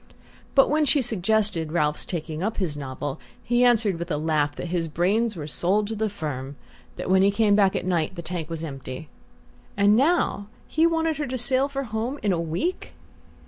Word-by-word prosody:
But 270 - +6
when 305 +1 +2
she 295 - +3
suggested 210 -6 0
Ralph's 150 -3 0
taking 160 -2 -4
up 215 +4 -2
his 175 -7 -1
novel 140 0 -5 0.2
he 245 +1 +2
answered 225 -7 +3
with 170 +1 -5
a 150 - 0
laugh 150 -1 0
that 175 - -5
his 170 -2 0
brains 200 +8 +1
were 155 -4 -5
sold 185 +8 +1
to 225 - -3
the 220 0 0
firm 145 -7 -5 0.4
that - - -5
when 190 +1 +4
he 195 - +5
came 205 0 +3
back 195 -2 +3
at - - -2
night 175 -1 0
the 170 - -6
tank 165 -1 -5
was 165 -1 -5
empty...And 155 +8 -3
now 270 - +2 0.2
he 320 +2 +3
wanted 325 -2 0
her 295 -1 -2
to 255 0 -3
sail 260 +3 +2
for 275 0 -3
home 230 +3 -3
in 205 - +2
a 170 - 0
week! 170 - -3
195 Hz, 195 wpm, -25 LUFS, 160-235 Hz, 0.4 s, But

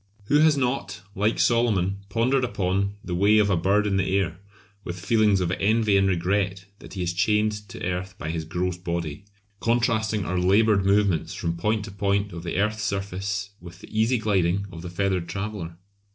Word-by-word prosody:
Who 145 - +5
has 155 -1 +5
not, 125 -6 -2
like 105 +3 0
Solomon, 105 -6 +2
pondered 125 +6 +1
upon 100 -3 -1
"the 90 - -5
way 100 +4 +4
of 105 -1 +3
a - - +3
bird 100 +5 +2
in 100 -2 +1
the 95 0 +1
air" 90 -3 -1 0.4
with 90 +1 -6
feelings 105 0 +3
of 90 -1 0
envy 105 +2 +2
and 95 0 +4
regret 95 +1 0
that - - -12
he 95 - -2
is 85 0 -1
chained 105 +3 +2 0.2
to - - -6
earth 90 +1 -3
by 80 - -4
his 80 -1 -3
gross 90 +3 -2
body; 85 -1 -4 0.3
contrasting 110 -3 +1
our 90 0 -1
laboured 100 +2 +3
movements 100 -4 +2
from 85 0 -2
point 105 +4 -1
to 105 - -8
point 100 0 -1
of 85 - -6
the 85 0 -4
earth's 105 +2 0
surface 100 0 -3
with 85 0 -11
the - - -12
easy 115 +3 +3
gliding 100 -3 +1
of 85 -3 -9
the 90 - -6
feathered 90 -1 -1
traveller? 95 -5 -5
100 Hz, 190 wpm, -25 LUFS, 90-105 Hz, 0.4 s, Who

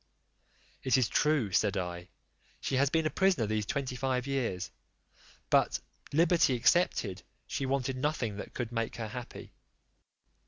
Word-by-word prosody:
"It 130 - +3
is 125 -4 +3
true," 150 -9 +2
said 100 +1 +2
I, 90 -1 -4 0.5
"she 135 - -1
has 140 +1 +4
been 160 +1 +1
a 155 - +1
prisoner 190 - +2
these 105 0 -1
twenty 135 -1 -2
five 130 -1 -1
years; 125 -10 -2 0.8
but, - - +3 0.3
liberty 165 -3 +4
excepted 120 - +2 0.2
she 135 - -3
wanted 135 -1 0
nothing 130 -7 -1
that - - -8
could 120 -2 -3
make 115 -1 -2
her 115 -3 -4
happy. 120 +2 -8
130 Hz, 145 wpm, -31 LUFS, 110-140 Hz, 0.8 s, has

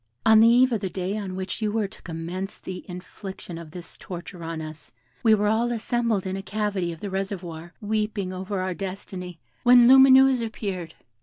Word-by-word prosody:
On 220 -1 +7
the 225 - +7
eve 250 +2 +5
of 225 - +1
the 190 - -2
day 185 +2 -3
on 195 -3 -4
which 190 +4 -4
you 215 -1 0
were 215 -1 0
to - - -16
commence 175 +4 -5
the 185 -1 -7
infliction 180 -1 -8
of 165 -2 -10
this 170 +1 -9
torture 175 -1 -8
on 165 0 -4
us, 155 -3 -8 0.3
we 220 -1 +5
were 210 0 0
all 225 +3 +1
assembled 230 -3 0
in 190 0 -2
a 195 - -4
cavity 195 -2 -2
of 165 - -10
the 200 - -5
reservoir, 175 -4 -5
weeping 210 -3 -2
over 190 +2 -4
our 185 0 -2
destiny, 185 -2 -6 0.2
when 245 -1 +7
Lumineuse 265 -1 +7
appeared. 195 -7 -5
195 Hz, 190 wpm, -25 LUFS, 180-220 Hz, 0.3 s, On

